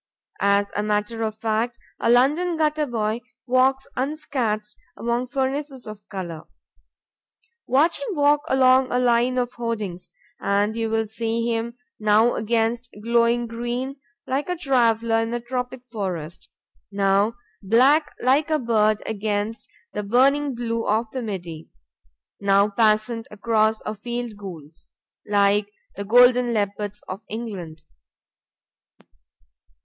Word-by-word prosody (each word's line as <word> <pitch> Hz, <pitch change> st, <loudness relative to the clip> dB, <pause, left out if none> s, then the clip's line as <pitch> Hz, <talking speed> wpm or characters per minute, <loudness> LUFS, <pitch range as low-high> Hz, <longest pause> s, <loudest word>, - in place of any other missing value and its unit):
As 200 Hz, 0 st, +2 dB
a 205 Hz, -, +1 dB
matter 210 Hz, +2 st, -1 dB
of 215 Hz, -1 st, -2 dB
fact, 225 Hz, +2 st, -1 dB, 0.2 s
a -, -, +1 dB
London 300 Hz, +8 st, +3 dB
gutter 305 Hz, -1 st, +1 dB
boy 225 Hz, -1 st, -1 dB, 0.2 s
walks 260 Hz, +1 st, +2 dB
unscathed 250 Hz, -7 st, -2 dB, 0.2 s
among 235 Hz, +2 st, -1 dB
furnaces 270 Hz, 0 st, -3 dB
of 210 Hz, -1 st, -10 dB
color. 170 Hz, -5 st, -6 dB, 1.2 s
Watch 290 Hz, +7 st, +3 dB
him 455 Hz, -7 st, -3 dB
walk 290 Hz, 0 st, +4 dB
along 260 Hz, 0 st, +5 dB
a 245 Hz, -, +1 dB
line 245 Hz, 0 st, +2 dB
of 250 Hz, 0 st, -1 dB
hoardings, 215 Hz, -7 st, -4 dB, 0.3 s
and 200 Hz, +2 st, +1 dB
you 225 Hz, -1 st, -1 dB
will 225 Hz, 0 st, 0 dB
see 230 Hz, +1 st, -2 dB
him 235 Hz, +1 st, -3 dB, 0.2 s
now 215 Hz, +2 st, +4 dB
against 230 Hz, +2 st, 0 dB
glowing 235 Hz, +1 st, +2 dB
green, 240 Hz, +4 st, -4 dB, 0.3 s
like 275 Hz, +6 st, -2 dB
a 360 Hz, -, -1 dB
traveler 230 Hz, -6 st, +2 dB
in 225 Hz, 0 st, -1 dB
a -, -, -1 dB
tropic 250 Hz, +1 st, -4 dB
forest; 185 Hz, -8 st, -5 dB, 0.4 s
now 200 Hz, +2 st, +2 dB, 0.3 s
black 265 Hz, +9 st, +4 dB
like 275 Hz, +5 st, +3 dB
a 310 Hz, -, +3 dB
bird 215 Hz, -5 st, +2 dB
against 210 Hz, +1 st, -3 dB, 0.3 s
the -, -, -2 dB
burning 265 Hz, +6 st, +2 dB
blue 230 Hz, -1 st, -2 dB
of 220 Hz, +1 st, 0 dB
the 260 Hz, -, -4 dB
Midi; 175 Hz, -7 st, -6 dB, 0.7 s
now 200 Hz, 0 st, +4 dB
passant 220 Hz, +2 st, +1 dB
across 220 Hz, +1 st, +1 dB
a 215 Hz, -, -2 dB
field 235 Hz, +1 st, -5 dB
gules, 170 Hz, -6 st, -11 dB, 0.4 s
like 205 Hz, 0 st, +3 dB, 0.3 s
the 200 Hz, -, -4 dB
golden 245 Hz, +2 st, +5 dB
leopards 205 Hz, 0 st, -2 dB
of 185 Hz, +3 st, -6 dB
England. 190 Hz, -9 st, -6 dB
230 Hz, 125 wpm, -23 LUFS, 210-250 Hz, 1.2 s, along